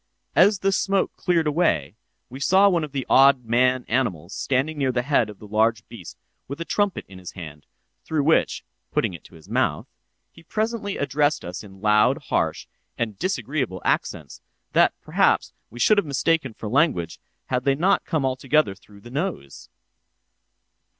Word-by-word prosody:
As 200 +2 +5
the 195 - +2
smoke 195 0 0
cleared 170 -3 +1
away, 145 - +1 0.3
we 130 +2 -10
saw 190 +7 +4
one 175 -4 +2
of 150 - -6
the 135 -2 -3
odd 135 -2 +5
man 125 +2 +2
animals 100 -8 -1
standing 140 +4 -1
near 135 -2 +1
the 120 -1 -1
head 125 -5 +2
of 105 - -10
the - - -13
large 110 +1 +1
beast 90 -7 -11 0.3
with 140 +4 -7
a 170 - -4
trumpet 205 0 -1
in 95 -1 -12
his 90 - -9
hand, 80 -5 -10 0.4
through 155 -2 -1
which 160 +3 +2 0.3
(putting - - 0
it 85 - -10
to - - -16
his 80 - -16
mouth) - - 0 0.5
he 165 - -17
presently 215 +3 -3
addressed 145 +2 0
us 90 +4 -6
in 95 -2 -14
loud, 105 0 +4
harsh, - - 0 0.3
and 110 -4 -3
disagreeable 140 - -2
accents, - - -2 0.3
that, - - +4
perhaps, - - +1 0.2
we 120 - -11
should 210 - +5
have 200 - -3
mistaken 140 -2 0
for 110 - -7
language, 110 - +1 0.3
had 125 0 +1
they 135 0 +2
not 185 +7 +2
come 155 -5 -1
altogether 130 -2 +1
through 100 +1 -19
the 120 - -13
nose. 140 - -5
130 Hz, 170 wpm, -23 LUFS, 105-160 Hz, 0.5 s, As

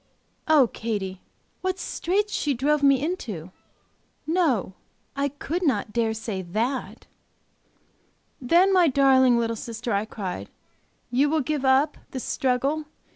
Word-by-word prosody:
Oh, 305 -4 +6
Katy, 205 -5 -4 0.4
what 375 0 -1
straits 410 +4 -1
she 285 -3 0
drove 290 +4 +1
me 275 -1 +4
into! 210 - -5 0.7
No, 310 - +1 0.4
I 280 0 0
could 290 +5 -4
not 215 - 0
dare 230 -1 +1
to 220 - -3
say 215 -3 -4
that!" 225 +9 -3 1.4
"Then, 350 +9 +4
my 360 -3 +5
darling 260 -3 +5
little 230 -1 0
sister" 230 +1 -5
I 200 +2 0
cried, 195 -5 -6 0.6
"you 275 +4 +3
will 315 0 +1
give 290 +1 -2
up 270 +3 +3
this 260 - -5
struggle? 275 +3 0
265 Hz, 130 wpm, -25 LUFS, 225-300 Hz, 1.4 s, Oh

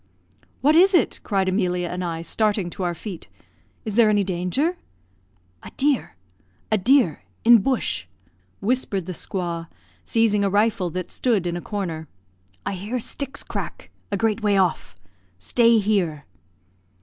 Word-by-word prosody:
"What 300 +3 +4
is 375 +3 +6
it?" 345 - +2
cried 195 -2 0
Emilia 180 -2 0
and 180 +1 -4
I, 165 -1 -3
starting 205 -2 0
to 195 - -7
our 175 -1 -1
feet. 185 0 -8 0.6
"Is 215 - -3
there 225 0 +5
any 205 -1 +3
danger?" 195 - -1 0.8
"A - - -10
deer 280 -2 +1 0.6
a 215 - +4
deer 230 - +3 0.2
in 235 0 +8
bush!" 225 - -1 0.5
whispered 200 -4 0
the 185 - -5
squaw, 170 -2 -4 0.4
seizing 220 -3 +2
a 200 - +2
rifle 205 -2 +2
that 185 +2 -5
stood 220 -8 +1
in 175 0 -1
a 175 - -4
corner. 170 -7 -4 0.6
"I - - -1
hear 205 +7 -3
sticks 280 +4 -5
crack - - -6 0.2
a 200 - 0
great 225 +1 0
way 205 -2 +2
off. 180 - 0 0.4
Stay 230 - +3
here!" 190 -8 0
200 Hz, 150 wpm, -23 LUFS, 180-230 Hz, 0.8 s, in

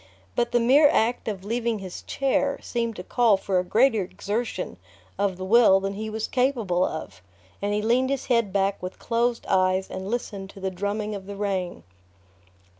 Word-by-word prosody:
But 235 0 +1
the 240 - +3
mere 275 +5 +6
act 240 -5 +1
of 195 -3 -4
leaving 230 +1 -1
his 190 -3 -7
chair 275 +1 0
seemed 230 -2 -2
to 180 - -7
call 230 -1 +3
for 190 -1 0
a - - 0
greater 225 +4 +3
exertion 205 +5 -4 0.4
of 200 -2 0
the 185 - -5
will 215 -2 +6
than 195 +1 -3
he 215 +2 -5
was 220 0 -3
capable 235 -9 +1
of, 155 - -4 0.4
and 205 +1 -1
he 210 0 0
leaned 250 +4 +2
his 275 -1 -2
head 230 -5 +2
back 195 0 0
with 180 +1 -6
closed 235 0 0
eyes 185 0 +2
and 190 +1 -5
listened 205 -5 -4
to 195 - -12
the 190 0 -2
drumming 205 +3 -3
of 195 -2 -7
the 200 - -6
rain. 190 - -3
210 Hz, 190 wpm, -25 LUFS, 190-235 Hz, 0.4 s, mere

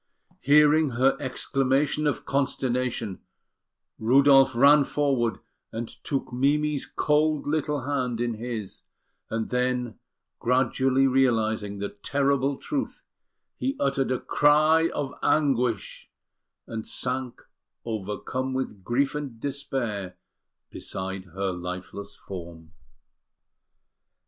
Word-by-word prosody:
Hearing 150 +2 +5
her 135 +2 +4
exclamation 135 +2 0
of 145 - -1
consternation, 125 -6 -1 0.8
Rudolf 135 +2 +5
ran 140 +4 +7
forward 135 -5 0 0.3
and 115 +1 -4
took 135 0 -4
Mimi's 145 +3 +1
cold 150 0 +1
little 150 -1 -1
hand 125 -3 -2
in 120 -1 0
his; 110 -3 -6 0.5
and 110 0 -3
then, 125 -1 -1 0.4
gradually 130 +2 +2
realising 110 -6 +1
the 100 0 -3
terrible 140 +5 0
truth, 280 - -4 0.5
he 270 +2 -1
uttered 135 -1 +1
a 130 - 0
cry 155 +3 +4
of 140 -2 -4
anguish 125 - 0 0.6
and 110 -1 -6
sank, 130 -1 -2 0.5
overcome 115 +5 -3
with 105 -7 -4
grief 135 +6 +1
and 140 -6 -5
despair, 120 -9 -3 0.6
beside 95 0 -5
her 95 +2 -3
lifeless 90 +3 -7
form. 85 -4 -9
130 Hz, 100 wpm, -26 LUFS, 110-140 Hz, 0.8 s, ran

